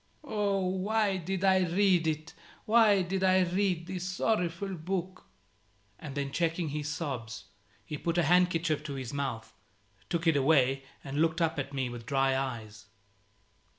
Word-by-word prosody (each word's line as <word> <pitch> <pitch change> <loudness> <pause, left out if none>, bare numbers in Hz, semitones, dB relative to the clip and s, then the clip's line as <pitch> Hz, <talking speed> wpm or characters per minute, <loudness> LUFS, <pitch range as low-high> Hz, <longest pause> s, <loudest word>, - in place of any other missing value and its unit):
"Oh, 205 -7 0
why 195 +2 +1
did 185 +2 -3
I 190 -1 +5
read 180 -1 +2
it? 155 0 -3 0.3
Why 215 -4 +5
did 190 +2 -2
I 185 0 +5
read 180 -1 0
this 180 0 -5
sorrowful 185 -1 -1
book?" 185 +2 -4 0.7
And 145 -3 -8
then 140 -1 -2
checking 165 +1 0
his 150 0 -3
sobs, 130 -8 -5 0.4
he 150 - -6
put 170 0 -1
a 175 - +4
handkerchief 165 -2 +2
to 140 -2 -4
his 130 -2 -6
mouth, 135 -6 -4 0.6
took 170 0 -1
it 165 -2 +4
away, 135 -2 +3 0.2
and 140 +2 -2
looked 165 +1 +2
up 165 -2 +1
at 135 0 -4
me 135 -2 -1
with 120 -1 -8
dry 135 0 +2
eyes. 110 -6 -5
165 Hz, 155 wpm, -30 LUFS, 140-185 Hz, 0.7 s, I